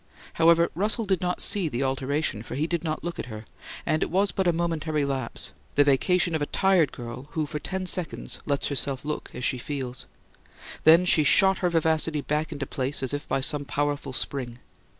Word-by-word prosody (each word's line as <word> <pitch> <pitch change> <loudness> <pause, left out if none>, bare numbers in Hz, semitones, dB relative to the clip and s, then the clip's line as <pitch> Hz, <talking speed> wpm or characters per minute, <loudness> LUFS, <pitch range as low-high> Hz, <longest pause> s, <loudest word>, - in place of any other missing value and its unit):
However, 170 +1 +4
Russell 215 +6 0
did 190 -3 +1
not 180 0 -1
see 190 -6 +1
the 130 0 -2
alteration, 135 -2 -1
for 115 - -7
he 150 +4 0
did 170 0 -2
not 155 -2 -3
look 175 0 -4
at - - -4
her; 110 -2 -8 0.4
and 155 - +1
it - - 0
was 195 +2 +2
but 190 0 0
a - - +5
momentary 160 -3 -1
lapse 135 -4 -4 0.2
the 145 - +6
vacation 170 +5 +2
of 160 - 0
a 145 - 0
tired 190 -6 +3
girl, 120 +3 -8
who 155 -1 0
for 150 +1 -4
ten 190 +4 -4
seconds 180 -2 -3
lets 140 -1 0
herself 140 -1 -1
look 150 0 -4
as 125 - -3
she 130 - 0
feels. 130 -1 -5 0.8
Then 165 +3 +7
she 160 -3 +4
shot 190 +6 +4
her 180 - +1
vivacity 160 -2 +1
back 150 +3 -1
into 145 -3 -4
place 135 0 -2
as 130 - -2
by 135 - 0
some 145 +2 +1
powerful 145 -1 -2
spring. 125 -2 -3
150 Hz, 200 wpm, -26 LUFS, 135-170 Hz, 0.8 s, Then